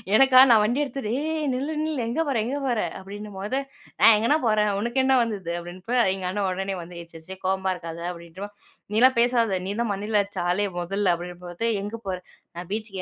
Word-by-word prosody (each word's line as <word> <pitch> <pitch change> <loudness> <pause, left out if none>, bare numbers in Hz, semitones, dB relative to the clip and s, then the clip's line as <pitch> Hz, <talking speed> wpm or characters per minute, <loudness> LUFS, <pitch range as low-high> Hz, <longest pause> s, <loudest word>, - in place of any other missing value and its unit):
எனக்கா 265 +1 +7
நான் 220 -2 +7
வண்டி 240 +7 +1
எடுத்துட்டு 270 -6 -4
"ஏய்! 315 +1 -2
நில்லு! 275 +5 -2
நில்லு! 310 -3 -2
எங்க 240 +8 -1
போற? 275 -4 0
எங்க 265 +4 -2
போற?" 245 -3 0 0.2
அப்டின்னும்போது 205 +4 -5 0.4
"நான் 225 - +8
எங்கணா 235 +8 +3
போறேன்! 210 -1 +3
உனுக்கு 235 +5 0
என்னா 265 0 +4
வந்துது?" 200 -7 -4
அப்டின்ப்பா, 180 +8 -4 0.2
எங்க 190 -1 -5
அண்ணன் 200 0 -1
ஒடனே 195 +1 -3
வந்து, 170 +1 -10
"ஏ - - -10
சர்சரி 165 +4 -10
கோவமா 190 0 +1
இருக்காத" 165 -1 -8
அப்டின்ட்டு 170 +2 -10
"வா" - - -10 0.5
"நீலாம் 255 +3 +5
பேசாத 235 -5 +2
நீ 195 - -2
தான் 235 -3 0
மண்டைல 205 +1 +1
அட்ச்ச 200 -1 -7
ஆளே 205 +3 +1
மொதல்ல" 190 +1 +1
அப்டின்னும்பொழுது 175 +4 -5
"எங்க 205 +3 -5
போற?" 185 -1 -1 0.4
"நான் 175 0 -7
பீச்சுக்கு 210 -3 -3
205 Hz, 195 wpm, -25 LUFS, 185-240 Hz, 0.5 s, நான்